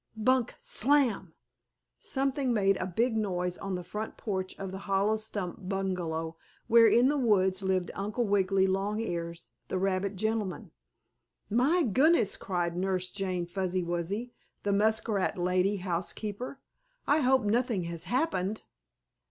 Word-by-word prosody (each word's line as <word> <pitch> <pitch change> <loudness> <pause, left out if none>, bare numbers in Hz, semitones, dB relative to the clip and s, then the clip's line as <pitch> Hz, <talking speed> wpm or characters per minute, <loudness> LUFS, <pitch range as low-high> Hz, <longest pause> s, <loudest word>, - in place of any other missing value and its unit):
Bunk! 250 +2 +2
Slam!" 290 - +2 0.6
Something 270 -1 -1
made 195 -3 +3
a - - -3
big 225 +6 0
noise 180 -4 -1
on 195 -1 -3
the 180 - -5
front 215 +5 -6
porch 190 -3 -3
of 195 -1 -5
the 190 - -6
hollow 200 +2 +2
stump 200 -3 -5
bungalow, 170 -4 -2 0.3
where, 230 0 +7
in 240 +3 +5
the 290 +1 +1
woods, 190 -5 +2
lived 190 -2 0
Uncle 210 +4 -2
Wiggily 195 -1 +2
Longears, 190 -4 -2 0.2
the - - -2
rabbit 195 +1 0
gentleman. 215 -2 -2 0.8
"My 285 - +3
goodness!" 260 - +3
cried 175 -3 -2
Nurse 185 0 -1
Jane 185 -3 -2
Fuzzy 185 0 -1
Wuzzy, 175 +8 -3 0.3
the 200 - +1
muskrat 215 -1 +1
lady 185 +3 +1
housekeeper. 195 +7 -3 0.5
"I 295 +2 +3
hope 265 -2 +3
nothing 225 -2 +1
has 170 -1 -5
happened!" 220 - -1
195 Hz, 135 wpm, -29 LUFS, 185-225 Hz, 0.8 s, where